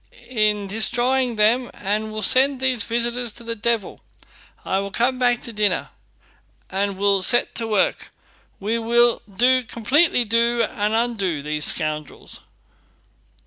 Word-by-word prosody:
"in 210 Hz, -3 st, +1 dB
destroying 240 Hz, +4 st, 0 dB
them, 230 Hz, +4 st, +2 dB
and 215 Hz, +2 st, -3 dB
will 215 Hz, 0 st, -4 dB
send 265 Hz, +5 st, +4 dB
these 255 Hz, -3 st, +2 dB
visitors 235 Hz, 0 st, -1 dB
to 235 Hz, -, -9 dB
the 230 Hz, 0 st, -4 dB
devil. 230 Hz, 0 st, -2 dB, 0.6 s
I 190 Hz, -, 0 dB
will 200 Hz, 0 st, -4 dB
come 245 Hz, +6 st, 0 dB
back 245 Hz, -1 st, +2 dB
to 235 Hz, -, -7 dB
dinner, 205 Hz, -3 st, 0 dB, 0.8 s
and 195 Hz, 0 st, -2 dB
we'll 200 Hz, -1 st, +2 dB
set 240 Hz, +6 st, +3 dB
to 225 Hz, -1 st, -3 dB
work. 210 Hz, -3 st, 0 dB, 0.5 s
We 220 Hz, +4 st, -2 dB
will 235 Hz, +1 st, +2 dB
do, 255 Hz, +5 st, +2 dB
completely 245 Hz, +4 st, +1 dB
do, 235 Hz, +2 st, +1 dB
and 210 Hz, 0 st, -2 dB
undo 200 Hz, -10 st, -1 dB
these 150 Hz, 0 st, -2 dB
scoundrels." 155 Hz, -2 st, -4 dB
225 Hz, 140 wpm, -21 LUFS, 205-240 Hz, 0.8 s, send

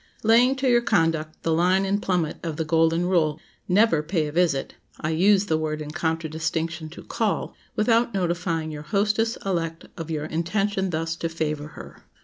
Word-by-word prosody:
LAYING 240 Hz, +4 st, +5 dB
to 265 Hz, 0 st, -1 dB
your 240 Hz, -1 st, +4 dB
conduct 165 Hz, -7 st, 0 dB
the 165 Hz, -, +1 dB
line 180 Hz, +4 st, +3 dB
and 200 Hz, +1 st, 0 dB
plummet 175 Hz, -5 st, 0 dB
of 160 Hz, -3 st, -4 dB
the 160 Hz, -, -1 dB
Golden 165 Hz, +2 st, +2 dB
Rule, 160 Hz, -4 st, +1 dB, 0.3 s
never 195 Hz, -4 st, +4 dB
pay 160 Hz, 0 st, -1 dB
a 150 Hz, -, -4 dB
visit 160 Hz, -4 st, +1 dB, 0.3 s
(I 155 Hz, -, -2 dB
use 195 Hz, +5 st, +4 dB
the 160 Hz, -5 st, 0 dB
word 155 Hz, -1 st, -2 dB
in 150 Hz, -1 st, -6 dB
contradistinction 160 Hz, 0 st, -2 dB
to 160 Hz, -, -11 dB
"call") -, -, -1 dB, 0.2 s
without 230 Hz, +2 st, +3 dB
notifying 170 Hz, -4 st, -1 dB
your 150 Hz, -1 st, -6 dB
hostess 210 Hz, +7 st, 0 dB
elect 165 Hz, -4 st, -2 dB
of 165 Hz, -1 st, -6 dB
your 155 Hz, -2 st, -2 dB
intention 190 Hz, +4 st, -1 dB
thus 165 Hz, 0 st, -2 dB
to 165 Hz, -, -2 dB
favor 155 Hz, -2 st, -3 dB
her. -, -, -11 dB
165 Hz, 175 wpm, -24 LUFS, 160-195 Hz, 0.3 s, LAYING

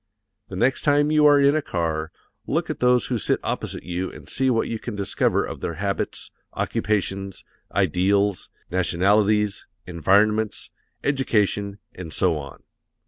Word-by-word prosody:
The 95 Hz, -, -7 dB
next 125 Hz, +7 st, +1 dB
time 145 Hz, 0 st, +3 dB
you 150 Hz, -1 st, +5 dB
are 145 Hz, -1 st, +6 dB
in 140 Hz, +1 st, +4 dB
a 155 Hz, -, +1 dB
car, 80 Hz, -, -2 dB, 0.4 s
look -, -, -1 dB
at -, -, -6 dB
those 125 Hz, 0 st, +3 dB
who 120 Hz, -3 st, -2 dB
sit -, -, +1 dB
opposite -, -, -4 dB
you 90 Hz, +1 st, -3 dB
and -, -, -13 dB
see 130 Hz, -1 st, 0 dB
what 115 Hz, -3 st, +1 dB
you 115 Hz, -, -4 dB
can 115 Hz, -2 st, -6 dB
discover 100 Hz, -1 st, 0 dB
of -, -, -7 dB
their 85 Hz, -, -4 dB
habits, 100 Hz, +3 st, -3 dB, 0.2 s
occupations, 100 Hz, -2 st, -2 dB, 0.3 s
ideals, 100 Hz, +1 st, +1 dB, 0.2 s
nationalities, 100 Hz, +4 st, +2 dB, 0.2 s
environments, 100 Hz, +5 st, +1 dB, 0.3 s
education, 105 Hz, -7 st, 0 dB, 0.2 s
and 85 Hz, -3 st, -8 dB
so 90 Hz, -1 st, +1 dB
on. 70 Hz, -2 st, -10 dB
100 Hz, 145 wpm, -23 LUFS, 90-120 Hz, 0.4 s, are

